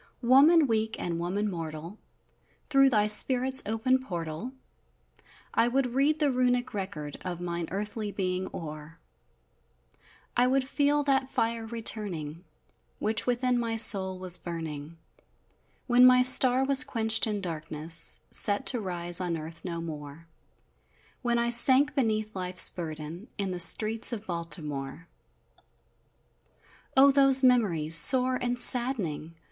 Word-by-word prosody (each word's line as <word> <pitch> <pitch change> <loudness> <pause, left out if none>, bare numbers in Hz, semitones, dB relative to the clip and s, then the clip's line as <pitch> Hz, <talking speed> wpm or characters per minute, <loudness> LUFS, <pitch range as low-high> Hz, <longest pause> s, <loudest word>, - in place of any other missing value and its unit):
_ - - -5
Woman 295 +5 +5
weak, 220 -2 -2
and 170 -1 -5
woman 190 +5 -3
mortal, 165 +1 -8 0.7
Through 275 -1 +4
thy 210 -4 +1
spirit's 255 +5 +3
open 225 +4 0
portal, 175 -1 -7 1.0
I 230 - +1
would 250 0 -2
read 285 +4 +1
the 295 -3 0
Runic 250 -1 -1
record 175 -8 -7
Of 180 -2 -6
mine 170 -1 -5
earthly 210 +2 -5
being 185 -1 -4
o'er 155 0 -10 1.4
I 245 +1 +2
would 260 0 -1
feel 290 +1 0
that 270 -1 -1
fire 230 -2 -3
returning, 195 -9 -5 0.5
Which 220 +3 -2
within 245 0 -1
my 230 -1 -3
soul 195 -4 +3
was 185 -1 +1
burning, 160 -2 -8 0.9
When 250 0 +5
my 250 0 +4
star 255 +1 +6
was 275 0 +5
quenched 225 -1 0
in 210 -1 -3
darkness, 160 -2 -1
Set, 205 -1 +2
to 245 -4 +1
rise 175 -2 -2
on 175 -2 -3
earth 160 +1 -10
no 170 -2 -6
more, 150 -1 -10 1.0
When 240 -1 -1
I 235 0 -1
sank 265 +4 +3
beneath 215 -5 -2
life's 180 -1 +1
burden 160 +3 -8
In 200 -2 -3
the 180 - -6
streets 220 +7 +5
of 220 -3 -7
Baltimore! 160 -3 -6 1.9
O, 275 +1 +6
those 275 -1 +5
memories, 195 -12 +1
sore 255 +8 +4
and 245 0 -3
saddening! 225 - +1
210 Hz, 130 wpm, -26 LUFS, 170-250 Hz, 1.9 s, star